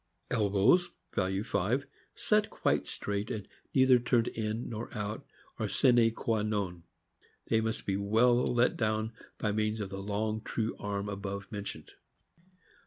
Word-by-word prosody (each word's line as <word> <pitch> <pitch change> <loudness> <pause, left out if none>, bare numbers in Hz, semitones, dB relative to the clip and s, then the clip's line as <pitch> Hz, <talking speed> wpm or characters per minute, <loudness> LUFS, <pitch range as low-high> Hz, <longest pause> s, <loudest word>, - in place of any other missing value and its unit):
Elbows 105 - +4 0.2
(value 95 +1 0
5) 110 +8 0 0.3
set - - +2
quite - - 0
straight, 100 +1 -3
and 105 -3 -4 0.3
neither 130 -2 +6
turned 120 -1 +2
in 110 +1 -3
nor 115 0 -5
out, 105 +1 -4 0.3
are - - 0
a - - -7
sine 120 -2 +5
qua 115 -1 -1
non. 100 -5 -2 0.7
They 110 -1 +3
must 110 +1 -2
be 95 -1 0
well 115 +5 +4
let 120 0 +3
down 110 0 0 0.3
by 105 - 0
means 110 +1 0
of 100 -2 -4
the 95 0 -5
long 110 +2 -1
true 110 +1 -2
arm 100 0 -3
above 100 0 -5
mentioned. 100 -2 -6
110 Hz, 150 wpm, -31 LUFS, 100-115 Hz, 0.7 s, neither